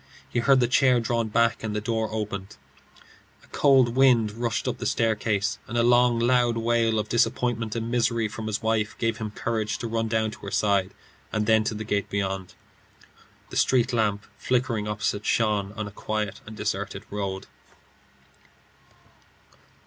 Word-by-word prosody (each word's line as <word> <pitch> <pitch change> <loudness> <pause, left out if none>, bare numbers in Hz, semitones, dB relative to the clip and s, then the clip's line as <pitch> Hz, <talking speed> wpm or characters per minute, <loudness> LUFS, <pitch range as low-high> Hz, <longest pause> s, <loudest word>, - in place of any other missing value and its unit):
He 120 - -1
heard 135 +3 +4
the 120 - +3
chair 125 0 +4
drawn 115 0 -1
back, 115 +1 +1
and 110 -1 -3
the - - 0
door 110 +1 -1
opened. 105 -2 -5 0.9
A - - -20
cold 130 -4 +4
wind 125 -5 +4
rushed 115 0 -2
up - - -2
the - - -2
staircase, 110 -2 0
and 120 - -3
a 115 - +3
long 120 0 +4
loud 120 0 +2
wail 115 -1 +1
of 105 0 -1
disappointment 115 0 0
and 115 0 -3
misery 115 -2 +1
from 110 +1 -6
his 110 +1 -3
wife 110 0 0
gave 115 -1 -1
him 110 -1 -3
courage 110 0 -2
to - - -6
run 115 0 -1
down 110 -1 0
to - - -11
her 100 - -7
side, 100 -1 +1 0.4
and 110 -1 0
then 110 0 +4
to 110 - -1
the 110 - -4
gate 105 -2 -1
beyond. 95 -2 -3 1.0
The - - -4
street 125 -1 +2
lamp 105 -3 0
flickering 120 -4 0
opposite 105 0 -2
shone 105 -3 +1
on 110 0 -4
a - - -8
quiet 105 -1 -4
and 110 0 -9
deserted 100 -2 -3
road. 100 -2 -4
110 Hz, 170 wpm, -25 LUFS, 105-120 Hz, 1.0 s, heard